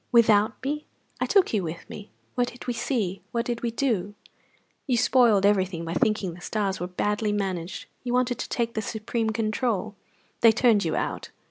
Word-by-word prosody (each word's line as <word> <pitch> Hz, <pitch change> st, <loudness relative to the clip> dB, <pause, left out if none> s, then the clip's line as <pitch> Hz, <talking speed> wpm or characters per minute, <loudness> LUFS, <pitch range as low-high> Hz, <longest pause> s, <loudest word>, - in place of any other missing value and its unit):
"Without 220 Hz, -3 st, +5 dB
me!" 300 Hz, +3 st, -3 dB, 0.3 s
"I -, -, 0 dB
took 395 Hz, -, +3 dB
you 210 Hz, -, +2 dB
with 165 Hz, -1 st, -6 dB
me." 210 Hz, -, -9 dB, 0.2 s
"What 245 Hz, -1 st, +1 dB
did 245 Hz, 0 st, -9 dB
we 245 Hz, -, -1 dB
see? 215 Hz, -7 st, -1 dB
What 235 Hz, 0 st, -1 dB
did 240 Hz, -1 st, -2 dB
we 235 Hz, -, 0 dB
do?" 225 Hz, -5 st, -1 dB, 0.7 s
"You 250 Hz, -3 st, +2 dB
spoiled 230 Hz, -5 st, +4 dB
everything 190 Hz, -4 st, +1 dB
by 165 Hz, -, -3 dB
thinking 210 Hz, -4 st, +1 dB
the 175 Hz, -, -12 dB
stars 200 Hz, -1 st, -1 dB
were 180 Hz, -, -3 dB
badly 210 Hz, +3 st, -1 dB
managed. 190 Hz, -4 st, -3 dB, 0.2 s
You 245 Hz, -, -3 dB
wanted 250 Hz, -1 st, +1 dB
to -, -, -4 dB
take 235 Hz, -1 st, -1 dB
the 220 Hz, -, -1 dB
supreme 220 Hz, +1 st, -2 dB
control. 215 Hz, -1 st, -1 dB, 0.5 s
They 230 Hz, -1 st, +7 dB
turned 225 Hz, -3 st, +4 dB
you 160 Hz, -2 st, -1 dB
out." -, -, -3 dB
215 Hz, 190 wpm, -26 LUFS, 195-240 Hz, 0.7 s, They